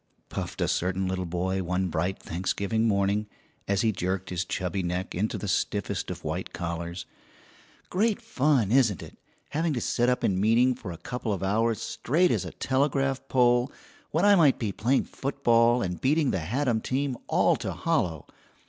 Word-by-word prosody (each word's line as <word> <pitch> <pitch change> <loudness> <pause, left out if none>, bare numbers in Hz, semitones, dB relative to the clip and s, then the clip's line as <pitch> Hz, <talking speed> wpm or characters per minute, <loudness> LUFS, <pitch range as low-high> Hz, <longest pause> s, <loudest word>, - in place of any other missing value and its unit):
puffed - - -5
a - - +2
certain 95 +1 0
little 95 -1 -2
boy 95 +2 -1
one 90 +1 -1
bright 85 +3 -1
Thanksgiving 100 +6 -1
morning, 100 0 +1 0.4
as 100 0 +1
he 115 - +3
jerked 95 -1 -3
his 90 0 -1
chubby 90 +1 -2
neck 90 +1 -3
into 105 +5 -1
the 105 - -5
stiffest 90 - -1
of - - -6
white - - -4
collars. 85 0 -4 0.9
"Great 210 +4 +1
fun, 140 - +1
isn't 115 - +3
it, - - -13 0.3
having 160 +1 0
to 125 - -1
sit 120 +1 +1
up 125 0 0
in 95 -1 +1
meeting 120 +4 +4
for 115 -7 -8
a 85 - -7
couple 115 +5 -4
of 95 -2 -2
hours 110 +3 +1
straight 170 +8 +1
as - - 0
a - - -6
telegraph 135 0 0
pole 125 0 +3 0.4
when 165 +6 +1
I 205 - +7
might 160 -8 +5
be 110 -4 -2
playing 125 +7 +1
football 120 -3 +2
and 90 -2 -4
beating 145 +1 +2
the 95 - 0
Haddam 115 - 0
team 135 +2 -1
all - - +3
to - - -4
hollow! 80 -4 -1
110 Hz, 175 wpm, -27 LUFS, 95-130 Hz, 0.9 s, I